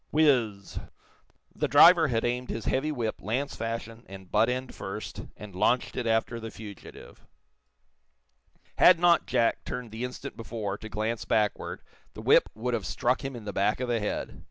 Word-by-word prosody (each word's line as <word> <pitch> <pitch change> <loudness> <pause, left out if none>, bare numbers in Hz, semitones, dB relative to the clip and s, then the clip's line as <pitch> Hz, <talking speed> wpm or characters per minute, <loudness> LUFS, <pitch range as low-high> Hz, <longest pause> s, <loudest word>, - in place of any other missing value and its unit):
Whizz 125 -10 +3
zz! - - -8 0.7
The - - -1
driver 170 -2 +7
had 115 -4 0
aimed 125 +1 -2
his 115 - -4
heavy 145 +4 0
whip, 115 -6 -3
lance 130 +7 -2
fashion, 115 0 -5
and 95 -2 -11
butt 110 +2 +3
end 130 +1 -3
first, 95 +2 -6 0.2
and 105 -2 -10
launched 120 +6 +1
it 125 -2 -2
after 115 +1 0
the 115 0 -6
fugitive. 105 -3 -12 1.5
Had 180 - +8
not 175 -1 +4
Jack 120 -2 +1
turned 125 -3 -6
the 110 +2 -5
instant 125 +2 -6
before, 110 -3 -4
to 110 - -8
glance 110 +2 -2
backward, 105 -2 -1 0.3
the - - -7
whip - - +5
would 120 +3 -2
have 105 -6 -2
struck 120 +9 0
him 135 -1 -4
in 115 -3 -9
the 105 - -5
back 100 +3 +1
of 125 -1 -3
the 120 -1 +1
head. 105 - -4
115 Hz, 180 wpm, -28 LUFS, 105-125 Hz, 1.5 s, Had